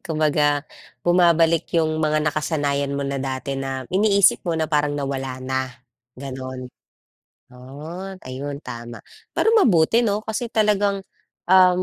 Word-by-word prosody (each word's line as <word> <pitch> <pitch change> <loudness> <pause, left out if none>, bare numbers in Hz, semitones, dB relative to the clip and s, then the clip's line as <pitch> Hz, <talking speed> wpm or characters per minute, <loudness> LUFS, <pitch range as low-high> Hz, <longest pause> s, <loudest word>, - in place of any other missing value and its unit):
kumbaga, 150 -3 +1 0.4
bumabalik 170 -2 +3
yung 155 -1 +1
mga 155 -1 +1
nakasanayan 145 -2 -1
mo 140 - -2
na 140 -1 -3
dati 135 0 -3
na 135 -1 -4
iniisip 200 0 +4
mo 170 -2 -2
na 160 - 0
parang 145 -2 0
nawala 135 -2 -3
na, 130 0 -2 0.5
ganon. 130 -1 -7 0.9
Oh, 155 +9 -8 0.2
ayun 140 +2 -5
tama. 120 -4 -8 0.3
Pero 450 +1 +2
mabuti 225 - +4
'no, 210 -1 -1
kasi, 230 +2 -3
talagang, 205 -3 +1 0.4
um, 185 0 +5
155 Hz, 125 wpm, -22 LUFS, 135-185 Hz, 0.9 s, um